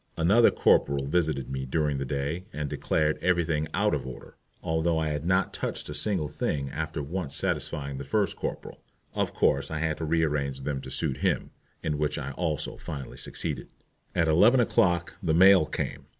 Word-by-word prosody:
Another 100 +8 +5
corporal 70 -1 +3
visited 75 -4 0
me 65 0 -4
during 75 0 0
the 70 - -2
day 70 +6 -3
and 75 -5 -3
declared 75 +2 0
everything 85 -4 +1
out - - +1
of - - -2
order, 65 - -10 0.3
although 80 +1 +1
I 80 -1 0
had 75 +2 -3
not 95 0 +2
touched - - -3
a - - -4
single 95 -8 0
thing 70 0 -2
after 80 0 -3
once 80 0 -4
satisfying 70 -1 -2
the - - -4
first 100 +7 0
corporal. - - -5 0.3
Of - - -1
course 70 0 +2
I 80 - -3
had 75 0 -1
to 80 - -3
rearrange 75 -4 0
them 70 0 -3
to 65 - -8
suit 65 +1 -2
him, - - 0 0.3
in 75 -2 -1
which 75 0 0
I 70 -2 -4
also 80 0 -3
finally 70 -4 -7
succeeded. - - -4 0.5
At 85 - +3
eleven 105 +11 +5
o'clock 90 -7 +2
the 80 -4 +1
mail 95 -2 +7
came. - - -4
75 Hz, 180 wpm, -27 LUFS, 70-85 Hz, 0.5 s, mail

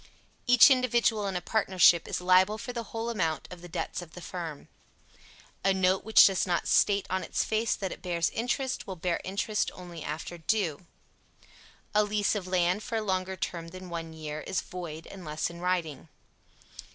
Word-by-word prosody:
Each 245 +3 +8
individual 235 -5 +2
in 195 - -3
a 180 - -1
partnership 185 -6 +4
is - - -2
liable 185 +3 +4
for 245 +3 -6
the 235 -1 -4
whole 225 +3 -4
amount 165 -8 -1
of 180 -1 -9
the 175 - -9
debts 170 - -3
of 170 -3 -12
the - - -9
firm. 165 -5 -6 1.0
A 195 0 +3
note 190 0 +2
which 220 +1 +7
does 195 -1 +2
not 175 -1 0
state 200 -1 +3
on 185 0 0
its - - -1
face 220 +1 0
that 190 -2 -4
it - - -8
bears 170 -2 0
interest, 255 +3 -2
will 190 - -5
bear 170 0 -2
interest 205 +2 -1
only 175 -3 -9
after 160 +3 -5
due. 170 -2 -1 1.1
A 210 0 +4
lease 205 0 +1
of 200 -4 -3
land 180 +2 +1
for 230 - -5
a 220 - +1
longer 190 -1 -1
term 170 -3 -4
than 185 +1 -10
one 165 -1 -5
year 155 -1 -6
is 190 - -1
void 165 -3 -7
unless 165 -4 -4
in 170 - -10
writing. 170 -4 -2
185 Hz, 185 wpm, -29 LUFS, 170-210 Hz, 1.1 s, Each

